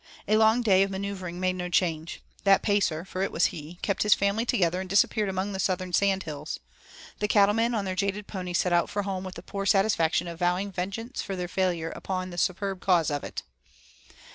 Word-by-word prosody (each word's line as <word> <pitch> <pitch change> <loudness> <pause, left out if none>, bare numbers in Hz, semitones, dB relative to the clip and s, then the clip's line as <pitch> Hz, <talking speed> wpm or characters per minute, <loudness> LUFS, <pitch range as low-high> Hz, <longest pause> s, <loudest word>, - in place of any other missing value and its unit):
A 215 - +3
long 220 +2 +4
day 190 -4 +5
of 195 - +2
manoeuvring 190 -2 -5
made 185 0 0
no 180 -1 -3
change. 165 -2 -1 0.2
The 195 -1 +6
Pacer, 195 -6 +1
for 185 -1 -5
it 195 - 0
was 165 - +2
he, 160 +3 -9
kept 200 - 0
his 210 -2 +5
family 200 +4 0
together 180 -7 +1
and 190 - -7
disappeared 200 +1 +2
among 190 +2 -2
the 190 - -4
southern 185 -1 -1
sand 195 0 +2
hills. 150 -1 -6 0.6
The 210 - 0
cattlemen 215 +3 +3
on 205 -2 -1
their 185 - -2
jaded 200 +1 -1
ponies 180 -3 -3
set 180 - +1
out 170 0 +2
for 205 0 -2
home 190 -1 -3
with 185 -1 -7
the 170 - -9
poor 195 +1 -4
satisfaction 180 -5 +2
of 170 -1 -7
vowing 180 +3 0
vengeance 200 +8 -4
for 195 - -4
their 180 -1 -3
failure 175 -3 -1
on 185 -1 -2
the 175 - -4
superb 190 +1 -1
cause 170 -5 +3
of 145 0 -2
it. - - -6
190 Hz, 215 wpm, -27 LUFS, 175-200 Hz, 0.6 s, The